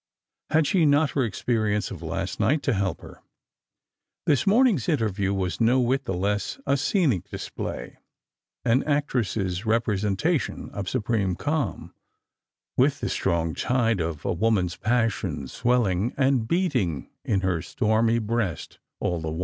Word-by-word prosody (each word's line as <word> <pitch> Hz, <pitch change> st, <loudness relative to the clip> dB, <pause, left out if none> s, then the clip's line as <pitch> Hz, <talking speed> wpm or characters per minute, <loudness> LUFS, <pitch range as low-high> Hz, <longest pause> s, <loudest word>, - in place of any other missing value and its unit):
[ad 155 Hz, 0 st, +3 dB
she 175 Hz, +3 st, +2 dB
not 145 Hz, 0 st, +3 dB
Lor 135 Hz, -, +3 dB
experience 110 Hz, -1 st, -1 dB
of -, -, -7 dB
last -, -, -4 dB
night 150 Hz, +1 st, +2 dB
to 135 Hz, -, +1 dB
help 95 Hz, -4 st, -1 dB
her? -, -, -13 dB, 1.0 s
This 145 Hz, +5 st, +2 dB
morning's 210 Hz, -, +4 dB
interview 105 Hz, -, 0 dB
was 95 Hz, -3 st, -2 dB
no 120 Hz, +3 st, +4 dB
whit 130 Hz, +2 st, +1 dB
the 95 Hz, -, -2 dB
less 100 Hz, -, -1 dB
a -, -, +2 dB
scenic 135 Hz, -, +1 dB
display -, -, -6 dB, 0.3 s
— -, -, -53 dB
an 125 Hz, +3 st, +4 dB
actress's 110 Hz, -10 st, 0 dB
representation 110 Hz, -, 0 dB
of 100 Hz, -2 st, -4 dB
supreme 105 Hz, -6 st, 0 dB
calm, 150 Hz, -, -2 dB, 0.8 s
with -, -, +3 dB
the -, -, -2 dB
strong 85 Hz, -1 st, 0 dB
tide 115 Hz, -2 st, +1 dB
of 80 Hz, -2 st, -3 dB
a -, -, +1 dB
woman's 90 Hz, -2 st, +1 dB
passion 115 Hz, -, 0 dB
swelUng 115 Hz, -, 0 dB
and 130 Hz, -4 st, +2 dB
beating 125 Hz, -, 0 dB
in 100 Hz, -2 st, 0 dB
her 90 Hz, -3 st, 0 dB
stormy 115 Hz, +2 st, +1 dB
breast 110 Hz, -6 st, -2 dB, 0.2 s
all 85 Hz, -1 st, -1 dB
the 80 Hz, -, -3 dB
while. 80 Hz, +2 st, -4 dB
115 Hz, 145 wpm, -25 LUFS, 95-135 Hz, 1.0 s, morning's